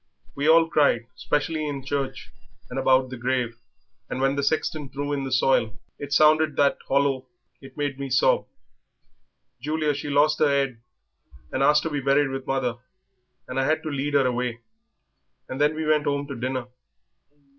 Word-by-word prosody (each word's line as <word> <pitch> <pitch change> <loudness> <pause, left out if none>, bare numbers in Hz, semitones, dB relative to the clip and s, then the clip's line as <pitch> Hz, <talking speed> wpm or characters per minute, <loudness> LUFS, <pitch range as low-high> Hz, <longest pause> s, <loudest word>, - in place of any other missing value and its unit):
We 145 +2 0
all 165 0 +6
cried, 145 -7 +2
especially 155 +1 -1
in 135 -2 -6
church 140 -1 -3 0.4
and 130 - -2
about 130 -1 +3
the 130 - -6
grave, 120 -1 -2 0.5
and - - -4
when 135 +1 +1
the 140 - 0
sexton 150 0 -1
threw 145 +1 -3
in 140 -1 -2
the 135 - -5
soil 125 -4 +2 0.2
it 145 0 -7
sounded 155 +1 +4
that 140 -1 +2
hollow 135 -1 +1 0.3
it 135 0 -14
made 145 -2 -2
me 140 -1 -4
sob. 130 0 +2 1.1
Julia, 155 +1 0
she 145 +1 -5
lost 145 +2 +3
her 150 - +4
'ead 135 -4 0 0.7
and 130 - -2
asked 150 +2 +4
to 160 - -3
be 145 -1 -2
buried 140 +1 +2
with 135 0 -6
mother, 130 -3 -1 0.7
and 125 +1 -3
I 135 - +1
had 155 +2 +1
to 155 - -3
lead 145 +1 -2
her 140 -2 +4
away; 125 -2 -2 0.9
and 130 +2 -5
then 150 +1 +3
we 160 0 -3
went 155 -1 +2
'ome 140 0 0
to 140 - -5
dinner." 130 +1 -3
140 Hz, 175 wpm, -24 LUFS, 130-145 Hz, 1.1 s, all